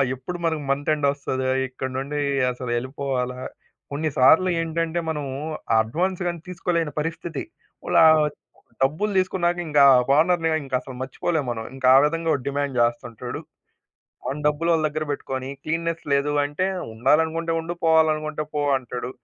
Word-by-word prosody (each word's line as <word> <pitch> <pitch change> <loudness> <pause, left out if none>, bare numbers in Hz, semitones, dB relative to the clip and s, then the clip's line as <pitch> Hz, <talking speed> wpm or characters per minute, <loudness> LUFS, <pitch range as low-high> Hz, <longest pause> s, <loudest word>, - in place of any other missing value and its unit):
ఎప్పుడు 175 +8 -6
మనకు 160 -2 0
month 145 +2 -1
end 145 -2 +1
ఒస్తదా? 130 -2 -3 0.2
ఇక్కడ్నుండి 130 +3 -4 0.3
అసలు 125 -1 -5
ఎళ్ళిపోవాలా 130 -1 -3 0.5
కొన్ని 155 +2 -1
సార్లు 160 +8 +6
ఏంటంటే 165 +1 -1
మనము 150 -4 -3 0.5
అడ్వాన్స్ 175 +11 -2
గాని 170 -1 -3
తీసుకోలేని 170 -3 -1
పరిస్థితి. 165 +1 -4 0.4
ఓ - - -9 0.2
ఆహ్, 155 -1 +6 0.6
డబ్బులు 155 +10 0
తీసుకున్నాక 180 -2 +1
ఇంకా 145 -2 +4 0.3
ఓనర్‌ని 165 0 +3 0.2
ఇంకసలు 130 0 -3
మర్చిపోలేము 145 +2 -2
మనం. 115 -1 -5
ఇంకా 130 -1 0
ఆ - - +9
విధంగా 165 +1 -1
వాడు 130 -3 -2
డిమాండ్ 140 -2 -2
చేస్తుంటాడు. 120 -1 -2 0.9
వాన్ 150 +2 -4
డబ్బులోళ్ళ 160 +2 +2
దగ్గర 155 +1 -2
పెట్టుకొని 130 -1 -4
క్లీన్‌నెస్ 165 +1 -2
లేదు 140 +1 +2
అంటే 145 +6 -1 0.3
ఉండాలనుకుంటే 160 +8 +1
ఉండు 170 +2 -5
పోవాలనుకుంటే 155 -1 +2
పో 150 - 0 0.2
అంటాడు. 125 0 -6
150 Hz, 135 wpm, -23 LUFS, 130-165 Hz, 0.9 s, ఆ